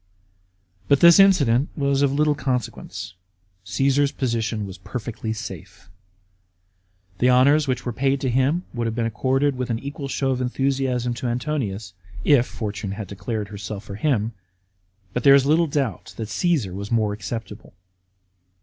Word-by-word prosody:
But 140 - +4
this 170 +2 +8
incident 145 -10 +4
was 140 -1 +1
of 140 -1 +3
little 150 +2 +2
consequence; 125 - -4 0.5
Caasar's 135 +8 +1
position 115 -4 -2
was 95 -1 -9
perfectly 110 +2 -5
safe. 95 -4 -8 1.3
The 125 - +4
honours 140 +4 +5
which 125 -2 -2
were 120 - -2
paid 135 +3 +1
to 130 - 0
him 135 +8 +1
would 120 -2 -2
have 110 - -3
been 115 -1 0
accorded 130 +5 +1
with 125 -1 -3
an 115 - 0
equal 140 +3 -6
show 135 0 -1
of 130 -1 -1
enthusiasm 125 -1 0
to 120 +1 -4
Antonius, 120 -7 -3 0.3
if 130 -4 +5
fortune 105 -2 -5
had 105 0 -5
declared 100 +3 -5
her 100 -1 -8
self 105 0 -6
for 100 - -9
him; 115 -1 0 0.8
but 125 - -2
there 140 0 +8
is 135 -1 +4
little 160 +3 +3
doubt 140 - -3
that 110 -2 -5
Caesar 150 - 0
was 100 +2 -6
more 110 -3 +1
acceptable. 105 +1 -7
125 Hz, 160 wpm, -23 LUFS, 110-140 Hz, 1.3 s, this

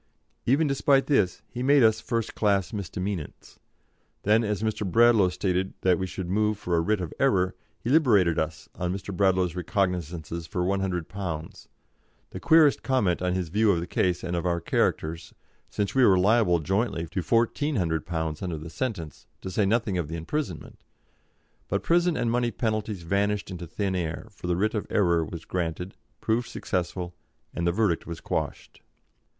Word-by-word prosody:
Even 140 +6 +4
despite 140 -1 +3
this 105 -11 +1
he 125 - -6
made 140 0 +5
us 110 -1 +4
first 115 -2 -2
class 100 -3 +1
misdemeanants. 95 -3 -5 0.6
Then, 110 +3 +4
as 105 -1 -2
Mr. 110 -1 -1
Bradlaugh 110 0 +5
stated 90 +1 -1
that 90 -2 +3
we 95 - -2
should 90 0 -5
move 105 +3 +1
for 90 -3 -1
a 85 - +3
writ 105 +4 +1
of 85 - -5
error, 95 -9 +2 0.3
he 120 - -3
liberated 105 - +4
us 80 0 -3
on 90 0 -2
Mr. 95 0 -5
Bradlaugh's 95 -2 +2
recognisance 85 -3 -2
for 90 - -2
£100, 90 -3 -3 0.6
the - - -6
queerest 160 -3 +5
comment 105 -11 +1
on 90 0 0
his 90 -3 -2
view 105 +4 +3
of 85 - +1
the 85 - -3
case 90 0 0
and 85 -1 -2
of 85 - -1
our 85 -1 0
characters, 80 0 -1 0.3
since 100 -1 -2
we 130 - +4
were 95 -5 +6
liable 100 -1 +4
jointly 95 +1 -1
to 95 - -2
£1,400 85 - 0
under 90 -4 -3
the 80 +2 -8
sentence, 100 - -5
to 95 - -5
say 100 +1 +1
nothing 105 -4 +1
of 80 - -2
the 80 - -5
imprisonment. 90 - -5 0.8
But - - -1
prison 175 0 +2
and 115 - 0
money 120 0 +1
penalties 110 -5 -2
vanished 100 +3 0
into 90 -2 -6
thin 100 +2 -2
air, 85 +4 -3
for 95 -3 -8
the 90 - +1
writ 105 +3 +1
of 105 - -2
error 85 -5 +2
was 80 +1 -7
granted, 90 +1 -3 0.3
proved 115 +2 0
successful, 90 -1 -3 0.4
and 85 - -1
the - - +3
verdict 95 -3 0
was 85 -1 -6
quashed. - - -4
95 Hz, 170 wpm, -26 LUFS, 85-110 Hz, 0.8 s, were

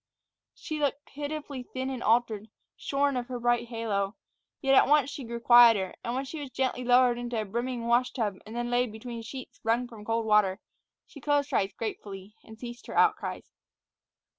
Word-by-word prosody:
She 310 -1 -5
looked 285 0 -1
pitifully 290 -2 -5
thin 260 +1 -4
and 255 -2 -5
altered, 225 -2 +1 0.3
shorn 280 0 0
of 245 -1 -2
her 250 -2 -5
bright 240 0 +1
halo; 215 -3 -2 0.4
yet 270 -1 +2
at 265 - +6
once 290 -1 +4
she 285 -2 -6
grew 235 0 -5
quieter, 230 -5 +6
and 235 - -2
when 265 +1 -2
she 300 +3 -6
was 285 -2 -6
gently 255 0 -1
lowered 245 0 +4
into 245 0 -4
the 215 -1 -1
brimming 235 +3 -3
wash 240 +2 +3
tub 210 -6 -2
and 220 - -8
then 240 0 -2
laid 245 -1 +1
between 230 +1 -7
sheets 255 +3 -9
wrung 230 +2 +1
from 225 -3 -11
cold 225 +1 -1
water, 210 -3 +3 0.5
she 285 - -13
closed 290 0 +1
her - - +3
eyes 195 0 0
gratefully 205 -2 -6
and 220 0 -13
ceased 240 +1 -9
her - - -5
outcries. 435 -1 +1
240 Hz, 190 wpm, -28 LUFS, 225-265 Hz, 0.5 s, at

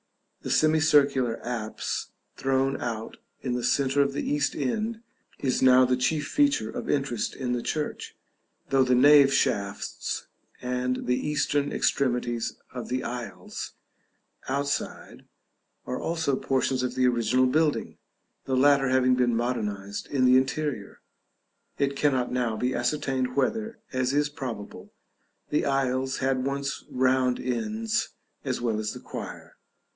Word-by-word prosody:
The - - -6
semicircular 145 -6 +3
apse, 115 -3 -3 0.3
thrown 135 0 0
out 115 -2 -4 0.3
in 125 - -1
the 125 0 -2
centre 140 +2 +2
of 140 0 +1
the - - -3
east 145 0 0
end, 215 - -2 0.3
is 130 -2 0
now 130 0 +7
the 125 0 +2
chief 145 +3 0
feature 285 - +2
of - - -5
interest 135 -5 -1
in 125 -2 -2
the 120 - -1
church, 150 +4 -4 0.5
though 135 -1 +5
the 125 -1 +3
nave 140 +1 +7
shafts 100 -6 -1 0.3
and 125 0 -2
the 125 - +2
eastern 145 -1 0
extremities 120 -3 0 0.2
of 125 -1 -6
the 130 +1 -1
aisles, 120 -1 -6 0.8
outside, 140 +1 -3 0.6
are 125 - -3
also 160 -4 0
portions 130 -1 0
of 125 0 -2
the 130 0 +2
original 125 +1 +2
building; 150 +3 +1 0.5
the 130 -1 0
latter 140 0 +4
having 130 -1 +4
been 125 -2 +2
modernized 105 -4 -2
in 130 -3 +1
the 125 0 +6
interior, 130 -4 -2 0.8
it 140 0 0
cannot 130 -3 +1
now 120 -3 0
be 125 +3 0
ascertained 130 0 -1
whether, 220 - 0 0.2
as 130 0 +1
is 145 +1 +1
probable, 120 -8 -7 0.6
the 150 - +2
aisles 130 -1 0
had 130 -1 0
once 140 0 -2
round 130 -1 +2
ends 115 -3 -2 0.3
as - - -2
well 115 -3 -1
as 110 0 -2
the - - -8
choir. - - -8
130 Hz, 140 wpm, -27 LUFS, 125-140 Hz, 0.8 s, now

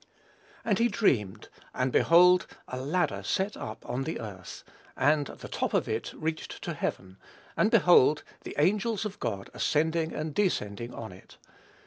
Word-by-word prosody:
"And 210 -2 +1
he 235 - +4
dreamed, 115 - 0 0.3
and 130 0 0
behold 180 +5 +5 0.2
a 130 - -5
ladder 170 +7 0
set 195 +1 -1
up 110 - -8
on 125 +2 -2
the 160 +4 -4
earth, 100 -5 -8 0.3
and 145 0 +3
the - - -9
top - - -2
of - - +1
it - - -3
reached 155 0 -4
to - - -3
heaven: 95 0 -4 0.4
and 215 - +3
behold 175 - +5 0.2
the - - -7
angels 210 +8 +1
of 210 -1 -6
God 100 -3 -4
ascending 160 +1 0
and 155 0 -4
descending 120 - -1
on 110 -3 -7
it. 90 +1 -16
155 Hz, 155 wpm, -28 LUFS, 120-185 Hz, 0.4 s, behold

